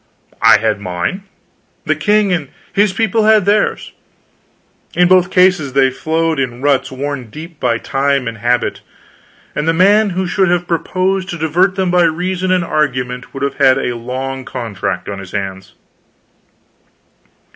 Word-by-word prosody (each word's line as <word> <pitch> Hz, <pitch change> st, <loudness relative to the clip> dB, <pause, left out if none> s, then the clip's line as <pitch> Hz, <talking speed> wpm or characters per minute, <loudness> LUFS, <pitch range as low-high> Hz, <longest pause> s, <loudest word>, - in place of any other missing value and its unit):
I -, -, +7 dB
had 105 Hz, -1 st, -1 dB
mine, 90 Hz, -, -3 dB, 0.6 s
the -, -, +2 dB
king 210 Hz, -2 st, +2 dB
and 155 Hz, -6 st, -2 dB, 0.2 s
his 205 Hz, 0 st, +3 dB
people 225 Hz, +2 st, +1 dB
had 215 Hz, -3 st, +4 dB
theirs. 210 Hz, +1 st, +1 dB, 1.0 s
In 180 Hz, 0 st, +4 dB
both 185 Hz, -1 st, +4 dB
cases 180 Hz, -7 st, +3 dB
they 135 Hz, -1 st, +3 dB
flowed 160 Hz, +2 st, -1 dB
in 125 Hz, -3 st, -2 dB
ruts 140 Hz, -3 st, +1 dB
worn 135 Hz, -2 st, -5 dB
deep 160 Hz, +6 st, -10 dB
by 115 Hz, -, +1 dB
time 135 Hz, +1 st, -1 dB
and 115 Hz, -2 st, -5 dB
habit, 120 Hz, +2 st, 0 dB, 0.7 s
and 150 Hz, -, -2 dB
the 165 Hz, -, +3 dB
man 205 Hz, +5 st, +4 dB
who 185 Hz, 0 st, -2 dB
should 190 Hz, +1 st, +1 dB
have 175 Hz, 0 st, 0 dB
proposed 185 Hz, +3 st, -1 dB
to 175 Hz, -, -4 dB
divert 175 Hz, +5 st, +1 dB
them 190 Hz, -2 st, 0 dB
by 180 Hz, 0 st, +3 dB
reason 180 Hz, +3 st, -1 dB
and 185 Hz, -1 st, +2 dB
argument 125 Hz, -6 st, -2 dB
would 135 Hz, 0 st, -6 dB
have 140 Hz, -, -2 dB
had 135 Hz, -2 st, +4 dB
a 125 Hz, -2 st, -2 dB
long 130 Hz, +3 st, -5 dB
contract 105 Hz, -8 st, -4 dB
on 100 Hz, -1 st, -5 dB
his 95 Hz, -2 st, -10 dB
hands. 95 Hz, -1 st, -5 dB
155 Hz, 155 wpm, -16 LUFS, 125-185 Hz, 1.0 s, I